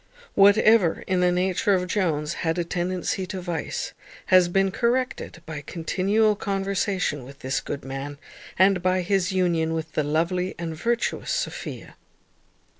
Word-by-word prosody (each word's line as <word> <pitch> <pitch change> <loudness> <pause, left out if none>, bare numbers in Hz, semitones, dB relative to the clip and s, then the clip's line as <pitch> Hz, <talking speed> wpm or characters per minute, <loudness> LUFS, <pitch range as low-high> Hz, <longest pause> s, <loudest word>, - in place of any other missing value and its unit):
Whatever 200 -2 +5
in 185 -1 +1
the 180 0 +3
nature 185 +2 +2
of 180 -1 0
Jones 165 -5 0
had 165 0 0
a 175 - +1
tendency 180 +2 -2
to 190 0 -5
vice, 175 -2 -4 0.4
has 185 -1 +7
been 195 +1 +2
corrected 240 -6 -1
by 155 -2 -6
continual 195 +8 +1
conversation 195 - -1
with 140 +3 -13
this 130 -2 -1
good 140 - -6
man, 135 +2 -5 0.4
and 190 0 +4
by 185 +1 +2
his 190 +1 +1
union 170 -4 +1
with 160 0 -4
the 155 - 0
lovely 170 +5 0
and 165 -1 -4
virtuous 235 +7 -1
Sophia. - - -4
180 Hz, 145 wpm, -25 LUFS, 160-195 Hz, 0.4 s, has